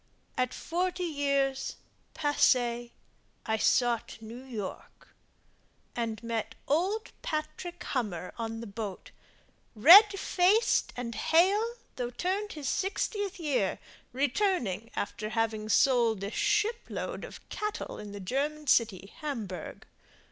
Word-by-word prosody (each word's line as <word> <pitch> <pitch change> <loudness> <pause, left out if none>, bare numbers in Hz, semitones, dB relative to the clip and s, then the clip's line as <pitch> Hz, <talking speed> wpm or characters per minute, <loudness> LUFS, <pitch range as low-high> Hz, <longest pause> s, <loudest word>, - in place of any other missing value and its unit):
At 255 -1 0
forty 360 +2 -2
years, 280 -4 0 0.4
passée, 245 -5 +2 0.6
I 220 0 +1
sought 240 +1 +2
New 230 +3 -9
York 220 -7 -7 0.9
And 230 -2 -3
met 230 -2 -3
old 375 +9 0
Patrick 310 +3 -4
Hummer 195 -9 -3
on 225 -1 -4
the - - -6
boat, 205 -2 -6 0.6
Red 395 - +9
faced 390 +7 +3
and 240 -1 -4
hale, 400 - +3 0.2
though 245 -1 -2
turned 375 - -2
his 295 -3 -5
sixtieth 400 - -1
year, 270 - 0 0.3
Returning 255 - 0
after 215 +1 -3
having 220 -1 -1
sold 230 -4 +3
a 200 - -3
ship 420 - +1
load - - -4
Of - - -10
cattle 425 0 -4
in 210 -1 -8
the 205 - -7
German 285 +9 -2
city, 215 -7 +2
Hamburg. 220 - -5
260 Hz, 115 wpm, -30 LUFS, 225-355 Hz, 0.9 s, Red